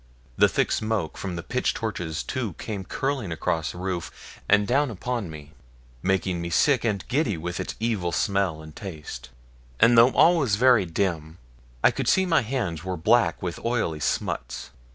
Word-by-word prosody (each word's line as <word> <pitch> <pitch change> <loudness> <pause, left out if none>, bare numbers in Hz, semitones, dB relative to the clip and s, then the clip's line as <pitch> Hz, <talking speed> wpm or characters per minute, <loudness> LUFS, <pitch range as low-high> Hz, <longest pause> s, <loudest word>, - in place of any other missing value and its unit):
The - - +5
thick - - 0
smoke 110 -7 -1
from 95 -3 -5
the 85 - -5
pitch 125 +8 -1
torches 90 -8 -3
too 120 -8 -3
came 100 +1 -6
curling 135 -7 -2
across 80 -1 -1
the - - -11
roof 90 -2 -6
and 105 0 +5
down 135 +5 +2
upon 115 -1 -3
me, 75 -1 -10 0.5
making 95 -2 0
me 85 - -4
sick 130 - +3
and 105 -5 -1
giddy 125 - 0
with 85 +2 -4
its - - -4
evil 105 -6 -1
smell 95 -3 0
and 80 -1 -12
taste; 80 -10 -8 0.5
and 120 +1 +6
though 115 +2 +8
all 175 +1 +6
was 130 -10 +2
very 120 -2 +5
dim, 80 -2 -2 0.5
I - - +6
could - - -3
see 190 - +4
my 175 -3 +3
hands 105 - -3
were 95 -1 -3
black 90 -2 +2
with 85 -3 -4
oily 115 -10 -1
smuts. 60 -3 -3
95 Hz, 175 wpm, -25 LUFS, 85-120 Hz, 0.5 s, though